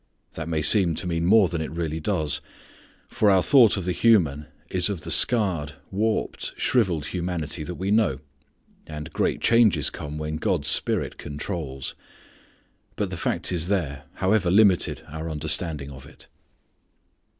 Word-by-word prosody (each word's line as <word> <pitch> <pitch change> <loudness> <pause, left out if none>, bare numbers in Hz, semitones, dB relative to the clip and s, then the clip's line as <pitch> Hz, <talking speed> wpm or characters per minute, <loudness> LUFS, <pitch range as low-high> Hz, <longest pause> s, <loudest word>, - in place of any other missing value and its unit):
That 80 0 -6
may 80 -2 -1
seem 85 0 +4
to 90 - -4
mean 85 -1 -1
more 105 -1 +5
than 85 -1 -4
it 80 - -4
really 80 -1 -4
does. 80 -4 -1 0.7
For 105 - +1
our 95 -2 +4
thought 115 - +5
of 95 - -4
the 90 - 0
human 85 -9 +2 0.2
is 90 +1 0
of 95 -5 -4
the - - -6
scarred, 90 -11 +3 0.2
warped, 110 +3 -2
shrivelled 90 - +1
humanity 85 -4 -3
that 90 +3 -6
we 95 +3 -3
know, 105 -11 +2 0.7
and 75 -1 -8
great - - -1
changes 115 -4 +3
come 75 +1 -7
when 75 0 -4
God's 80 -3 0
Spirit - - +1
controls. 75 -3 -6 1.0
But 100 -3 -3
the - - -4
fact 85 0 +1
is 85 -2 0
there, 75 -8 -2
however 95 0 +1
limited 95 -1 +3
our 80 +2 -6
understanding 75 -1 -3
of 65 0 -12
it. - - -14
85 Hz, 155 wpm, -24 LUFS, 75-95 Hz, 1.0 s, more